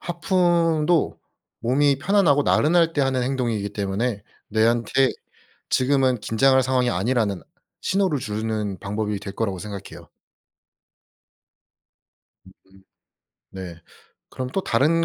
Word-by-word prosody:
하품도 170 - +1 0.4
몸이 135 +3 +2
편안하고 160 -4 +3
나른할 165 +3 +3
때 145 - 0
하는 135 -2 +1
행동이기 120 -6 -2
때문에 100 +2 -2 0.3
내한테 115 +4 +2 0.6
지금은 130 -2 +2
긴장할 130 +5 +3
상황이 125 -1 +1
아니라는 105 -2 0 0.4
신호를 190 -6 +1
주는 105 -3 -3
방법이 105 +1 -3
될 100 - -8
거라고 100 -4 -2
생각해요. 100 0 -9 2.4
으음. 95 0 -21 0.7
네. 95 -3 -8 0.5
그럼 130 -1 -5
또 195 - 0
다른 155 +8 +2
125 Hz, 245 characters per minute, -23 LUFS, 105-145 Hz, 2.4 s, 편안하고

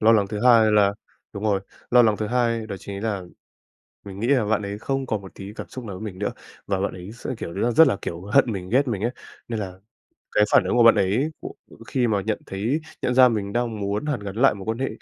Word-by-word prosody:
Lo 110 +1 +6
lắng 105 -3 +3
thứ 105 0 -4
hai 115 -3 +6
là 100 -1 +4 0.4
đúng 100 0 -6
rồi, 100 -3 +2 0.3
lo 125 0 +7
lắng 110 -3 +3
thứ 105 - -2
hai 115 -1 0
đó 100 - -5
chính 100 +2 -7
là 105 -4 -2 0.8
mình 100 0 -8
nghĩ 115 - -1
là 130 -5 +3
bạn 105 0 +1
ấy 100 0 -5
không 135 +3 -2
còn 110 -4 -2
một 95 - -11
tí 100 +1 -8
cảm - - -8
xúc 130 -2 -8
nào 100 -4 -6
với 95 - -8
mình 95 -4 -7
nữa, 105 - -1 0.4
và 95 -2 0
bạn 100 - -1
ấy 90 +3 -9
sẽ, 120 - -8
kiểu 85 - -6
như 95 - -5
là, 120 - +2
rất 160 +7 +7
là, 100 - +1
kiểu, 85 0 -5
hận 115 +6 +3
mình, 95 -3 -5
ghét 130 +5 +3
mình 105 -5 -2
ấy. 120 +3 0 0.4
Nên 115 -2 -3
là 95 -3 -5 0.6
cái 105 - +5
phản - - +6
ứng - - 0
của 120 - +6
bạn 115 0 +8
ấy, 105 +9 +1
ờ, - - -4 0.4
khi 125 -3 0
mà 105 -3 +1
nhận 105 +1 -2
thấy 115 +11 -1 0.2
nhận 125 - 0
ra 130 0 +7
mình 105 -4 -2
đang 115 -2 -2
muốn 100 +8 -2
hàn 145 -6 -1
gắn 100 0 -7
lại 135 0 +4
mối 100 -2 -9
quan 110 +1 -2
hệ, 135 - -1
110 Hz, 270 wpm, -23 LUFS, 100-120 Hz, 0.8 s, bạn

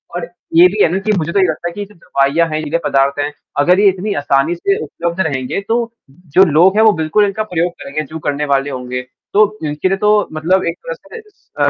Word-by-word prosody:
और 170 -1 -4 0.3
ये 175 +2 +8
भी 205 +3 -2
है - - +3
ना 190 - 0
कि 215 +2 -1
मुझे 165 0 -2
तो 200 - +1
ये 185 - +4
लगता 160 +1 -3
है 170 - -11
कि 205 - -5
जब 210 +1 -19
दवाइयाँ 160 0 +1
हैं 155 - -3
ये - - -2
नशीले 155 +2 -1
पदार्थ 140 +1 +1
हैं 145 +1 -1 0.3
अगर 180 +6 +4
ये 205 - +5
इतनी 195 +3 -3
आसानी 140 +4 +1
से 195 +3 0
उपलब्ध 170 +3 -4
रहेंगे 130 +5 -3
तो 230 - +2 0.6
जो 190 - +9
लोग 180 +6 +5
हैं 220 - +5
वो 220 - +7
बिल्कुल 165 +7 +2
इनका 205 +2 -2
प्रयोग 175 +1 +1
करेंगे 150 +2 -4
जो 155 +3 -8
करने 145 +1 -1
वाले 135 +1 0
होंगे। 125 -1 -4 0.3
तो 210 +1 +6 0.3
इसके 150 +5 -1
लिए 195 - 0
तो 210 0 +2
मतलब 175 +5 +1
एक 170 - -6
तरह - - -3
से 465 -2 -12
स 400 - -36
अ, - - +4
170 Hz, 250 wpm, -16 LUFS, 145-195 Hz, 0.6 s, जो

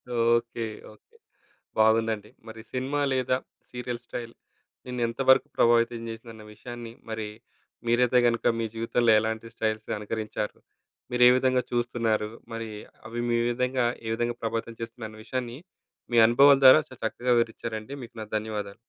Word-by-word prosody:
Okay. 115 0 +1 0.3
Okay. - - -26 0.6
బాగుందండి. 110 -1 +2 0.2
మరి 110 0 -9
cinema 135 +3 -1
లేదా 130 0 +1 0.3
సీరియల్ 125 -1 -5
స్టైల్ 115 -1 -6 0.5
నిన్ను 125 -1 -4
ఎంత 115 - -7
వరకు 130 - +6
ప్రభావితం 115 0 +3
చేసిందన్న 115 -1 -9
విషయాన్ని, 120 +1 -8 0.2
మరి 110 -1 -3 0.6
మీరైతే 125 +1 +3
గనుక 115 -1 0
మీ 115 - 0
జీవితంలో 115 +1 +2
ఎలాంటి 110 +1 -3
స్టైల్స్‌ని 110 -1 -2
అనుకరించారు. 105 0 -4 0.5
మీరే 125 0 +6
విధంగా 130 -1 +2
చూస్తున్నారు. 115 -3 0 0.2
మరీ 115 -1 -5 0.4
అవి 120 +1 -4
మీ 120 0 +2
విధంగా 125 0 0 0.2
ఏ - - -3
విధంగా 120 0 -1
ప్రభావితం 115 0 -3
చేస్తున్నాయన్న 110 -2 -7
విషయాన్ని 125 +1 -4 0.6
మీ - - +4
అనుభవాల 140 +3 +6
ద్వారా 130 +4 +10
చాలా 130 - -13
చక్కగా 125 +2 0
వివరిచ్చారండి. 115 +1 -2
మీకు 115 - -12
నా - - -5
ధన్యవాదాలు. 105 -2 -5
115 Hz, 135 wpm, -27 LUFS, 110-125 Hz, 0.6 s, ద్వారా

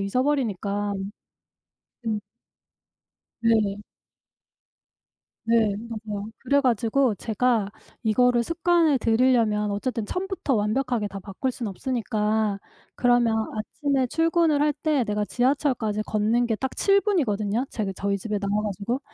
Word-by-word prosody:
잊어버리니까. 205 -3 0 1.1
음. 220 -2 0 1.2
네. 210 -3 +2 1.6
네. 225 -2 +3 0.3
맞아요. 210 0 -4
그래 280 +2 +2
가지고 245 -1 +2
제가 220 0 0 0.3
이거를 240 +2 +3
습관을 335 -1 +2
들이려면 225 -3 +2
어쨌든 225 +2 -2
처음부터 365 - -2
완벽하게 225 +1 0
다 195 0 -7
바꿀 200 +7 -3
수는 240 -2 -5
없으니까 215 -2 -1 0.4
그러면 245 -2 +3 0.2
아침에 270 +4 -1
출근을 325 0 +2
할 300 0 +3
때 300 -5 +2
내가 210 -1 -1
지하철까지 245 -4 0
걷는 220 +3 +1
게 225 - +1
딱 265 +4 -4
7 395 0 +4
분이거든요 230 - 0
제가 210 -4 -3
저희 200 +1 -1
집에 210 +2 -3
나와 200 +1 0
가지고. 210 +5 -2
230 Hz, 275 characters per minute, -25 LUFS, 210-265 Hz, 1.6 s, 7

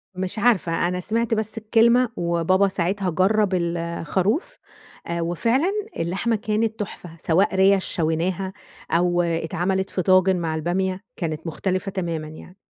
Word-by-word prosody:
مش 185 +3 -3
عارفة، 185 -7 +2
أنا 180 0 -2
سمعت 225 +4 0
بس 220 0 -1
الكلمة 235 +3 +3
وبابا 170 +3 +2
ساعتها 190 +1 -1
جرب 195 +4 +2
الخروف، 175 - -1 0.6
وفعلًا 230 - +1 0.3
اللحمة 190 +7 0
كانت 215 +1 -1
تحفة 195 -3 -6
سواء 180 +5 +2
ريَش 190 0 +4
شويناها، 175 +4 -1 0.4
أو 175 +1 +2
اتعملت 175 +3 -1
في 185 - -1
طاجن 185 0 +4
مع 165 -2 -2
البامية 185 +4 -1
كانت 160 -1 -4
مختلفة 185 +4 -2
تمامًا 170 -5 -3
يعني. 155 +4 -12
185 Hz, 130 wpm, -23 LUFS, 170-205 Hz, 0.6 s, ريَش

